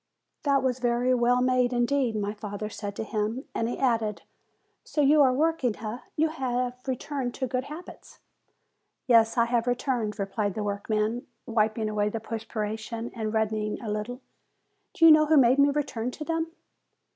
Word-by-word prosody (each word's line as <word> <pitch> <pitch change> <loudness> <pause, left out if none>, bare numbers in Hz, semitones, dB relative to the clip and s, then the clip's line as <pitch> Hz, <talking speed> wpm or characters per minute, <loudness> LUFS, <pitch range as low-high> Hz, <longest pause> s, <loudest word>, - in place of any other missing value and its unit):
"That 280 -2 +2
was 255 -1 0
very 245 +1 +2
well 245 0 +3
made, 255 -1 +2
indeed," 245 -1 +1
my 205 -1 -2
father 210 0 -5
said 205 -1 -6
to 225 - -3
him. 220 +4 -2
And 230 - -1
he - - -3
added, 225 -5 0 0.6
"So - - -5
you 295 +2 +5
are 265 -2 +6
working 275 -4 +1
eh? 220 +2 -5 0.2
You 315 +1 +2
have 250 -4 -2
returned 260 -1 -3
to 260 - -2
good 255 +1 -2
habits?" 310 +5 -11 0.9
"Yes, 230 -1 +4
I 235 - +5
have 235 0 0
returned," 245 -4 -1
replied 200 0 -2
the 215 - -2
workman, 215 +3 -1 0.2
wiping 220 -1 0
away 210 -1 0
the 225 - -4
perspiration, 225 +1 -4
and 220 -2 -3
reddening 215 -1 -1
a 220 -3 -5
little. 210 +4 -3
"And 255 - -19 0.7
do 330 - +5
you 325 - +10
know 310 0 +6
who 310 0 +5
made 260 0 +5
me 280 +1 +6
return 275 -5 -2
to 305 +4 -7
them?" 330 0 -1
240 Hz, 175 wpm, -27 LUFS, 215-260 Hz, 0.9 s, you